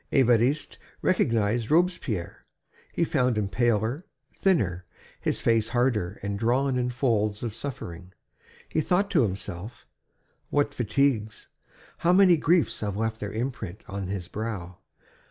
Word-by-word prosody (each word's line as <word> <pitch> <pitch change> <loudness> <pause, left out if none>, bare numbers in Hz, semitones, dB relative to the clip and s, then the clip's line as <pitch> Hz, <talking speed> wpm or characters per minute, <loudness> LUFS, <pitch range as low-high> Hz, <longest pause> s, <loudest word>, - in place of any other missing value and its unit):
Évariste 125 +2 +2 0.3
recognized 115 - +1
Robespierre. 155 - 0 0.5
He 170 - 0
found 125 -7 +1
him 105 -2 0
paler, 120 - 0 0.3
thinner, 95 - +1 0.4
his - - -1
face 115 -1 +2
harder 120 -5 0
and 100 0 -3
drawn 130 +4 +2
in 125 0 0
folds 110 -5 0
of 115 -3 -3
suffering. 95 -9 -7 0.6
He 155 - 0
thought 195 +6 +1
to 160 - +4
himself: 100 0 -4 0.6
"What 145 0 +1
fatigues, 115 -2 0 0.5
how 175 +1 +3
many 185 -2 +7
griefs 165 +1 +2
have 100 -2 -3
left 110 0 -1
their 105 - -4
imprint 110 -5 -4
on 100 -2 -4
his 95 -2 -4
brow! 100 -5 -5
115 Hz, 130 wpm, -26 LUFS, 105-140 Hz, 0.6 s, many